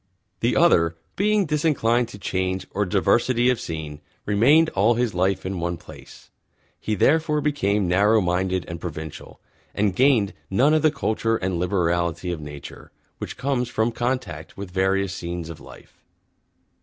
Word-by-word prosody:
The - - +1
Other, 85 0 +4 0.2
being 210 0 +2
Disinclined 140 -6 +1
to 115 - -11
Change 95 -1 -2
or 105 0 -1
Diversity 120 +6 +2
of 125 - -2
Scene, 75 -2 -6 0.2
remained 140 +11 +4
all 110 +5 +3
his 120 -2 0
Life 95 +1 0
in 95 -1 -3
One 85 0 -2
Place. 80 -5 -14 0.5
He 110 - -2
therefore 150 - +2
Became 105 -10 0
Narrow 100 +5 +4
Minded 90 0 0
and 85 -1 -7
Provincial, 80 -3 -8 0.4
and 100 -2 +1
gained 125 -6 +3 0.2
None 130 +10 +3
of 155 - +3
the 155 - +5
Culture 115 -6 -1
and 95 -3 -2
Liberality 85 -1 0
of 85 -3 -5
Nature 75 -1 -10 0.3
which - - -6
comes 125 -3 -1
from 110 0 0
Contact 120 -10 -4
with 100 -2 -7
various 95 0 0
Scenes 85 -2 -5
of 80 - -10
Life. - - -15
100 Hz, 155 wpm, -23 LUFS, 90-120 Hz, 0.5 s, the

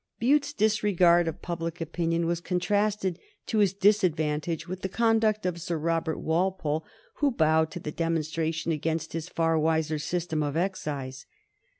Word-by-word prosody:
Bute's 285 +5 +2
disregard 200 - +3
of 165 - -5
public 165 -1 -4
opinion 165 0 -1
was 170 0 -1
contrasted 200 +1 0 0.3
to 220 - 0
his 200 -3 +4
disadvantage 170 -5 +1
with 185 +1 -6
the 190 - -2
conduct 220 -1 +2
of 175 -2 -2
Sir 170 -1 -2
Robert 165 0 -1
Walpole, 160 -2 0 0.3
who 290 - +3
bowed 160 - +2
to 175 - -7
the 150 - -5
demonstration 160 0 -1
against 160 +1 -2
his 165 +1 -4
far 165 -2 +1
wiser 160 -1 +1
system 160 0 -2
of 145 +1 -1
excise. 145 -8 -3
170 Hz, 150 wpm, -27 LUFS, 160-190 Hz, 0.3 s, his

